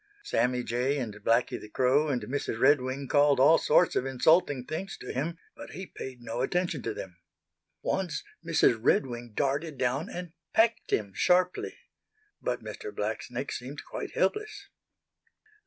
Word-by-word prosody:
Sammy 125 - +1
Jay 125 +5 0
and 120 -6 -3
Blacky 115 +2 +1
the 105 - -10
Crow 130 +6 +3
and 125 -6 -1
Mrs. 125 -1 -3
Redwing 135 0 +3
called 145 -1 +4
all 150 +5 +7
sorts 180 - +4
of - - +2
insulting 135 0 +3
things 185 +7 -5
to 125 - -7
him, 165 +6 -2 0.2
but - - -10
he 190 - -6
paid 130 -7 -9
no 115 +1 -3
attention 175 0 0
to - - -3
them. 90 -2 -8 0.7
Once 185 -5 -1 0.2
Mrs. 160 -8 +3
Redwing 120 -3 +1
darted 145 +2 -1
down 130 +4 0
and 175 -2 -7 0.2
pecked 225 0 +3
him 100 -3 0
sharply. 180 - +2 0.6
But - - -2
Mr. 425 - -7
Blacksnake - - -3
seemed - - -6
quite - - -6
helpless. 425 0 -1
140 Hz, 150 wpm, -29 LUFS, 125-165 Hz, 0.7 s, all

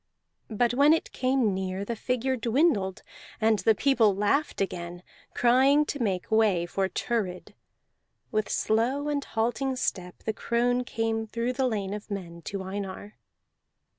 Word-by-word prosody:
But 235 +2 +1
when 285 +4 +5
it 325 - -1
came 255 -5 +1
near 190 +1 -3
the 235 - -3
figure 250 +3 -1
dwindled, 230 - +1 0.4
and 220 -2 +3
the 220 - +3
people 230 -6 +3
laughed 210 +10 0
again, 175 -2 -4 0.3
crying 265 +5 +4
to 285 -2 -4
make 190 -4 -1
way 210 -6 +3
for 190 +2 -1
Thurid. 195 -7 -3 0.8
With 215 -1 0
slow 255 +7 0
and 285 -1 -1
halting 245 +4 -1
step 180 -7 -3
the 220 - -1
crone 245 +2 0
came 225 -1 -2
through 235 +3 -2
the 265 0 +1
lane 205 -4 -2
of 210 0 -7
men 175 -4 -6
to 195 -1 -4
Einar. 195 +1 -6
225 Hz, 145 wpm, -27 LUFS, 195-250 Hz, 0.8 s, when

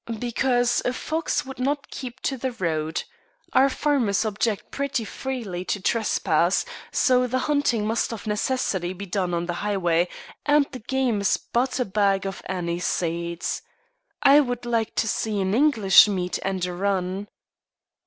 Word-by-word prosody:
"Because 245 0 +1
a 250 - 0
fox 315 +3 -2
would 265 -1 -9
not 280 +2 -1
keep 255 -1 -7
to 270 - -1
the 260 0 -3
road. 160 -5 -2 0.5
Our 270 +1 +5
farmers 255 -9 +1
object 215 0 -1
pretty 280 -5 -2
freely 220 -8 -4
to 205 - -1
trespass; 185 -4 +1 0.3
so 250 -1 +3
the 255 +1 0
hunting 285 -7 +1
must 225 +3 0
of 230 -2 -7
necessity 210 -4 -1
be 195 +2 -7
done 185 -1 -1
on 170 0 -1
the 175 - -2
highway, 180 -4 +1 0.4
and 295 0 +4
the 255 - -7
game 245 -2 0
is 200 - +2
but 250 +2 -1
a 250 - +1
bag 195 -1 +1
of 195 - -5
anise 175 -2 -2
seed. 170 0 -2 0.8
I 280 +2 +8
would 245 -4 -1
like 230 -2 -1
to 225 - +1
see 215 -1 -1
an 190 0 0
English 230 -8 +6
meet 180 -3 -2
and 190 -2 -1
a 180 - -4
run." 190 +1 -1
215 Hz, 160 wpm, -24 LUFS, 185-255 Hz, 0.8 s, I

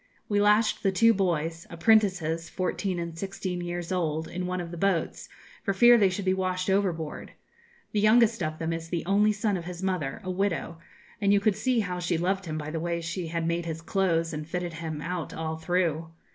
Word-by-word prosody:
We 205 -1 +2
lashed 210 +2 +3
the 195 - +2
two 230 +5 +5
boys 165 -4 -1
apprentices, 170 -4 +2
fourteen 185 +1 -2
and 170 -1 -4
sixteen 185 0 -4
years 175 0 -4
old 160 -3 -1
in 180 0 -4
one 180 0 -2
of 170 -1 -5
the - - -6
boats, 185 -2 -1 0.3
for 200 -3 -1
fear 240 +4 +8
they 205 -5 +5
should 185 +1 -4
be 185 - +3
washed 185 0 -1
overboard. 175 -6 -1 0.6
The 210 - 0
youngest 220 +1 +4
of 155 -1 -2
them 165 0 -2
is 165 0 -5
the 170 -1 -2
only 205 +3 +4
son 210 -1 0
of 170 - -7
his 180 +1 -7
mother, 180 -8 -1
a 185 - -3
widow; 185 -3 -2 0.4
and 200 -1 +3
you 200 - +5
could 200 0 +2
see 245 +2 +1
how 180 -3 -3
she 175 -1 0
loved 190 +2 -1
him 155 -1 -3
by 155 0 -5
the 160 - -2
way 170 +1 -1
she 170 +1 -4
had 165 0 -2
made 170 0 -1
his 165 0 -5
clothes, 165 -2 +1
and 150 0 -5
fitted 180 -1 -3
him 160 -2 -5
out 180 -1 -4
all 160 0 -3
through. 165 -1 0
180 Hz, 215 wpm, -27 LUFS, 165-195 Hz, 0.6 s, fear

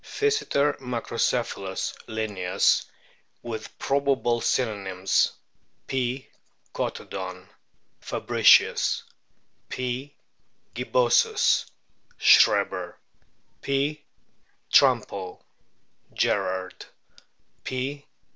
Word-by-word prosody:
Physeter 420 - 0
macrocephalus, 115 -5 -2
Linnaeus* 105 -5 +1 0.6
(with 110 -2 -7
probable 135 -4 +1
synonyms: 100 -7 0 0.5
P. 130 0 -2 0.5
catodon, 95 -1 -5 0.5
Fabricius; - - +3 0.7
P. 130 +3 -4 0.6
gibbosus, 475 -3 +2 0.5
Schreber; - - +4 0.7
P. 140 +2 -1 0.7
trumpo, 95 -2 +3 0.8
Gerard; 95 -1 -1 0.8
P. 140 +3 -4
125 Hz, 50 wpm, -25 LUFS, 100-140 Hz, 0.8 s, Schreber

